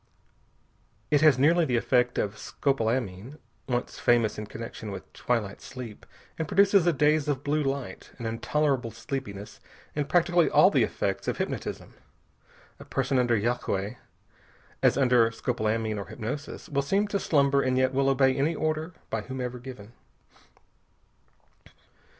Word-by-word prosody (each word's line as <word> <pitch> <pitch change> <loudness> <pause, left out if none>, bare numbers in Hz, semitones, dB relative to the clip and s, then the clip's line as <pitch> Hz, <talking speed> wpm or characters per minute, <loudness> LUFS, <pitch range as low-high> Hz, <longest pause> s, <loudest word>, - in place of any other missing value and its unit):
It 145 -1 +4
has 155 -4 +6
nearly 165 +6 +4
the 125 -6 +1
effect 125 0 +2
of 100 - 0
scopolamine 115 0 -2 0.3
once 125 0 -2
famous 115 -3 +2
in 105 - -6
connection 115 -1 -7
with 100 - -8
twilight 115 -5 -2
sleep 120 -4 -9 0.3
and 160 - -1
produces 200 -1 +4
a - - +6
daze 150 0 +2
of 140 -2 -1
blue 150 +2 +1
light, 135 -8 -4
an 120 - -7
intolerable 125 +2 0
sleepiness, 110 -3 -6 0.4
and 145 -1 -2
practically 175 -1 +3
all - - +6
the - - +3
effects - - -1
of - - -1
hypnotism. - - -4 0.9
A - - -11
person 135 0 0
under 120 -2 +2
yagué, 110 -1 -1 0.8
as - - +4
under 125 -4 +4
scopolamine 110 -2 -1
or 100 - -6
hypnosis, 125 +6 -6
will 140 -1 0
seem 195 +9 +1
to 200 - 0
slumber 140 -5 +3
and 130 -1 +1
yet 130 0 +2
will 135 +1 +2
obey 135 -1 +3
any 150 +5 +1
order, 155 +2 -2 0.2
by 115 - -1
whomever 125 +1 -5
given. 120 -4 -10
130 Hz, 145 wpm, -27 LUFS, 115-145 Hz, 0.9 s, has